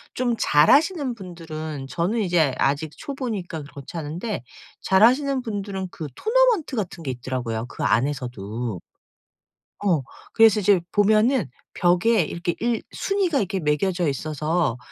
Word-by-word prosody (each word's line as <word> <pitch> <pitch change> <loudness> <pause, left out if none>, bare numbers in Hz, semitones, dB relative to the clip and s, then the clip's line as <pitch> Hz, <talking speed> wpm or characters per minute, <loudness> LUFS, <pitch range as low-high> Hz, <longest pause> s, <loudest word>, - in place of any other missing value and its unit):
좀 245 -2 0
잘하시는 275 - +4
분들은 160 -7 -7
저는 180 - 0
이제 170 -8 +2
아직 145 +3 +1
초보니까 215 - -5
그렇지 140 +3 -10
않은데 165 - -4 0.4
잘하시는 255 +7 +4
분들은 200 -4 -4
그 155 - -6
토너먼트 455 - +2
같은 175 -4 -4
게 135 - -2
있더라고요, 120 -2 -3
그 - - -6
안에서도. 120 - -1 1.1
어. 165 -8 +3 0.3
그래서 225 -1 +6
이제 195 -2 +4
보면은 215 - +3 0.3
벽에 180 +5 +3
이렇게 170 +2 -3
일 235 -1 0
순위가 385 -7 0
이렇게 195 -1 -1
매겨져 170 +4 0
있어서 155 0 -1
180 Hz, 305 characters per minute, -23 LUFS, 150-230 Hz, 1.1 s, 그래서